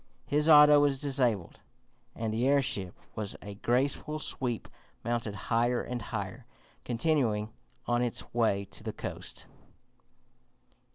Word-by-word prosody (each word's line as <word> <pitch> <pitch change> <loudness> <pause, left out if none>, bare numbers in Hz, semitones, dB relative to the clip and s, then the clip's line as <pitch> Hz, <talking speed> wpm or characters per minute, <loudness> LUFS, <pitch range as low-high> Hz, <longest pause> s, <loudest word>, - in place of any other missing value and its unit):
His 150 +3 +2
auto 150 -1 +9
was 145 -2 +2
disabled, 125 -10 0 0.6
and 110 -1 -2
the 120 +4 +1
airship, 125 -10 +1 0.2
with 105 -2 -3
a 100 - -7
graceful 130 +8 0
sweep, 125 -5 -3 0.4
mounted 120 -3 -2 0.2
higher 120 +1 +2
and 125 -1 -4
higher, - - -5 0.4
continuing 115 -5 0 0.3
on 120 0 +1
its 120 -2 -3
way 110 -4 +2
to - - -7
the - - -4
coast. - - -6
120 Hz, 120 wpm, -30 LUFS, 110-140 Hz, 0.6 s, auto